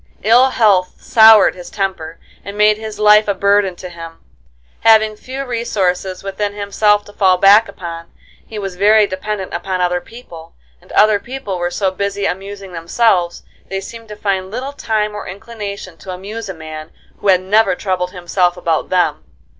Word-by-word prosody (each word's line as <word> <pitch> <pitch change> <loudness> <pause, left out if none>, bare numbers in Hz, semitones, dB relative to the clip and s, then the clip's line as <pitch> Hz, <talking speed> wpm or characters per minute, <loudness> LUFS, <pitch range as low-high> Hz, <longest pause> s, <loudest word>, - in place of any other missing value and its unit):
Ill 245 +5 +5
health 200 -7 +2
soured 220 -2 +6
his 180 -1 -11
temper 185 -5 -4 0.2
and 200 +1 -8
made 210 0 +4
his 220 -1 -7
life 210 0 +5
a 200 - 0
burden 200 -1 +2
to 180 - -9
him. 165 -2 -10 0.6
Having 220 -1 +4
few 265 +5 -7
resources 195 -7 -2
within 200 +1 -3
himself 205 0 +1
to 205 - -14
fall 185 -3 +3
back 205 +4 +5
upon, 170 -2 -8 0.3
he 220 - -10
was 195 -3 -5
very 210 +2 +5
dependent 195 0 -5
upon 185 +2 -3
other 180 0 0
people, 170 -9 -13 0.3
and - - -18
other 210 -1 +4
people 240 -6 -6
were 175 0 -1
so 190 +2 -1
busy 200 +1 -3
amusing 195 0 -5
themselves, 175 +1 0 0.3
they 195 - -3
seemed 230 +3 -10
to 210 - -9
find 195 -2 -2
little 255 +6 -5
time 215 -5 -2
or 210 - -7
inclination 200 -3 -8
to 190 - -13
amuse 200 +4 -7
a - - -4
man 155 -1 -9 0.3
who - - -4
had 185 -2 +4
never 210 +1 +2
troubled 180 -2 -2
himself 180 0 -1
about 165 -3 -1
them. 180 -1 0
200 Hz, 170 wpm, -17 LUFS, 180-215 Hz, 0.6 s, soured